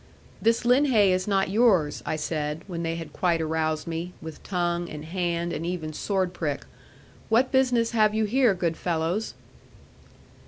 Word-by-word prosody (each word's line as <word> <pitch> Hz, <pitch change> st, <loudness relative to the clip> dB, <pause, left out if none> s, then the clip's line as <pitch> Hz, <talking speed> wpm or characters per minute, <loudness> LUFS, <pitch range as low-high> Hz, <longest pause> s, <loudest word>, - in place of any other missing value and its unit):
'This 230 Hz, +2 st, +2 dB
linhay 245 Hz, -5 st, +4 dB
is 185 Hz, +1 st, 0 dB
not 195 Hz, -2 st, +1 dB
yours,' 195 Hz, -10 st, +3 dB
I -, -, 0 dB
said, 150 Hz, +1 st, -3 dB
when 175 Hz, -3 st, -5 dB
they 165 Hz, 0 st, -2 dB
had 165 Hz, -1 st, -7 dB
quite 175 Hz, -3 st, +1 dB
aroused 155 Hz, -1 st, -1 dB
me, 170 Hz, +2 st, -4 dB
with 160 Hz, -1 st, -9 dB
tongue, 175 Hz, -2 st, -1 dB
and 150 Hz, 0 st, -7 dB
hand, 170 Hz, 0 st, -2 dB
and 155 Hz, -, -4 dB
even 165 Hz, -3 st, -3 dB
sword 190 Hz, +1 st, -1 dB
prick: 150 Hz, -5 st, -3 dB, 0.6 s
'what 240 Hz, +4 st, +3 dB
business 250 Hz, -3 st, +2 dB
have 215 Hz, -2 st, +3 dB
you 220 Hz, 0 st, +2 dB
here, 240 Hz, -1 st, +3 dB
good 170 Hz, -2 st, -1 dB
fellows?' 170 Hz, +5 st, -1 dB
175 Hz, 160 wpm, -26 LUFS, 160-215 Hz, 0.6 s, linhay